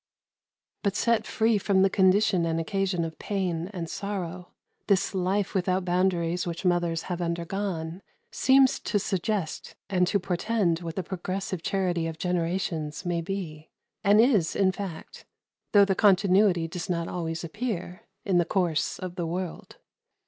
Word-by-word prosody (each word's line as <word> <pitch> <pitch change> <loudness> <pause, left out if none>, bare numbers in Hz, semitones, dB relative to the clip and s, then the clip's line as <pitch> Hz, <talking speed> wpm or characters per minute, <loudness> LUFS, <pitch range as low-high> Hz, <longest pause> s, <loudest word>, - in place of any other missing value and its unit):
But 200 -1 0
set 230 -1 +1
free 220 -1 +2
from 190 -1 +3
the 195 - +4
condition 190 -1 +3
and 165 0 0
occasion 185 0 -1
of 160 -1 -8
pain 180 -4 -2
and 175 -5 -5
sorrow, 185 -1 -5 0.4
this 200 -1 +2
life 190 +2 0
without 185 -1 0
boundaries 180 -1 +1
which 170 +2 -5
mothers 175 -2 +1
have 180 -1 -4
undergone 170 0 -3 0.3
seems 265 0 +4
to 210 - -1
suggest 195 -3 -2 0.2
and 180 -2 +3
to 200 - +2
portend 180 -1 0
what 165 -2 -6
the 190 - -2
progressive 185 0 -4
charity 175 -2 0
of 160 -1 -5
generations 170 -2 -2
may 175 -1 0
be 165 -4 -5 0.3
and 205 +1 +5
is, 220 -9 +3
in 190 -1 +3
fact, 185 -4 -8 0.4
though 200 -1 +7
the 195 - +1
continuity 190 -3 +4
does 170 +3 -6
not 170 -1 -1
always 165 -2 -3
appear 180 -1 -5 0.2
in 185 -3 +3
the - - +4
course 170 -3 0
of 185 -1 -6
the 170 -2 -2
world. 180 +1 -5
180 Hz, 150 wpm, -27 LUFS, 170-195 Hz, 0.4 s, though